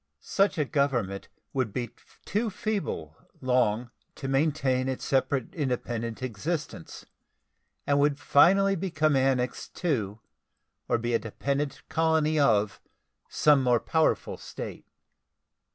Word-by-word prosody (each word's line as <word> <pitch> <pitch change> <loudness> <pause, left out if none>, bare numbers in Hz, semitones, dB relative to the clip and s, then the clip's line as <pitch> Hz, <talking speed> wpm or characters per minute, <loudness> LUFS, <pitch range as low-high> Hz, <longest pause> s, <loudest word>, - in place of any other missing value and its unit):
Such 195 -2 +1
a 150 - +1
government 125 -9 -1 0.2
would 130 -6 0
be 120 +2 -3 0.3
too 220 +3 0
feeble 200 - -3 0.2
long 125 -2 +1 0.2
to 135 - -6
maintain 135 -2 +1
its 130 - -4
separate 135 +3 0
independent 120 - -3
existence, 130 - -4 0.8
and 140 0 +2
would 145 0 +3
finally 195 +10 +5
become 155 -5 +1
annexed 130 -2 0
to 115 - -1 0.7
or - - +2
be 120 +1 -2
a 115 - +3
dependent 140 +5 -3
colony 160 -1 +2
of 105 -8 +2 0.5
some 150 -2 +4
more 125 -2 +3
powerful 160 +4 +1
state. - - -8
135 Hz, 115 wpm, -27 LUFS, 120-155 Hz, 0.8 s, finally